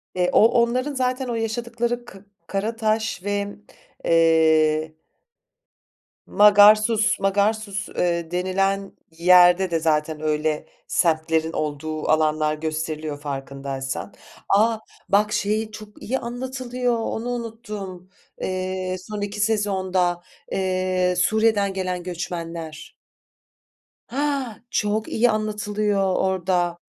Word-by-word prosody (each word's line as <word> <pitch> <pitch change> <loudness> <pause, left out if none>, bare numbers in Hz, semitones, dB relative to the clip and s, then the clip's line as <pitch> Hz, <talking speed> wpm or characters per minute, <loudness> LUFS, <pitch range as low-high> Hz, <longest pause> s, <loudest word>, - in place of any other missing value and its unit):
Eee, 180 -1 +1
o - - +6 0.2
onların 255 +5 0
zaten 255 0 -1
o 235 - -2
yaşadıkları 235 +1 -2
ka 195 -5 -12 0.3
Karataş 220 0 -1
ve 205 0 -1 0.6
eee 160 -1 +3 1.3
Magarsus 215 +2 +5
Magarsus, 200 +1 0
eee, 170 -1 -1
denilen 195 +2 0 0.2
yerde 180 +1 +6
de 165 - +1
zaten 155 -1 0
öyle 155 0 -1 0.2
semtlerin 160 -1 +1
olduğu 155 +1 -3
alanlar 155 -1 +2
gösteriliyor 155 -1 -4
farkındaysan. 135 +2 -5 0.4
A! 220 +3 +3 0.3
Bak 210 +2 +3
şeyi 215 +2 -1
çok 215 0 -12
iyi 265 +4 -1
anlatılıyor, 250 0 -3
onu 225 +1 -3
unuttum, 215 -6 -6 0.3
eee, 185 0 -2
son 205 +3 -7
2 205 +1 -4
sezonda, 190 -4 0 0.3
eee, 185 -1 0
Suriye'den 210 +1 +2
gelen 185 -2 -3
göçmenler. 170 -2 -6 1.1
Ha, 275 -4 -2
çok 215 0 0
iyi 240 +1 +3
anlatılıyor 210 -2 0
orda. 180 -2 0
195 Hz, 100 wpm, -23 LUFS, 165-220 Hz, 1.3 s, o